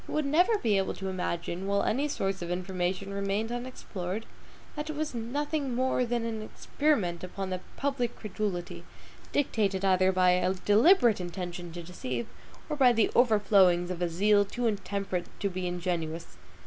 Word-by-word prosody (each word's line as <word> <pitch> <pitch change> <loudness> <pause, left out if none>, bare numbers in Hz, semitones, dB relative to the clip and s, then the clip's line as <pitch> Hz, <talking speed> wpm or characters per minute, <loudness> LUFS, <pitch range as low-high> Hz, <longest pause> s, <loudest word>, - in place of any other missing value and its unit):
He - - -8
would 305 -1 +1
never 355 +10 +4
be 215 - +2
able 190 - -1
to 190 0 -4
imagine, 180 0 -3
while 200 0 +1
any 275 +6 +1
source 195 -9 -2
of 175 - -4
information 185 +2 -2
remained 200 +3 -1
unexplored, 225 -5 -5 0.5
that 300 0 -4
it 310 - -3
was 305 -1 -2
nothing 275 +3 -2
more 255 0 +1
than 235 -1 -1
an 225 -1 -3
experiment 215 - -1
upon 185 +1 -5
the 185 - -2 0.2
public 270 -4 -1
credulity, 200 -4 -4 0.5
dictated 200 -8 +1
either 185 0 +4
by 185 -1 +4
a 180 +1 +2
deliberate 225 - +5
intention 175 -1 -5
to 175 0 -7
deceive, 130 -9 -4 0.4
or 300 - -2
by 260 -4 +6
the 225 -2 +2
overflowings 195 -6 +4
of 180 -1 -5
a 175 - +1
zeal 205 +4 +4
too 235 +5 -4
intemperate 200 -4 -2
to 200 - 0
be 180 0 -3
ingenuous. 170 -2 -3
200 Hz, 165 wpm, -29 LUFS, 180-240 Hz, 0.5 s, by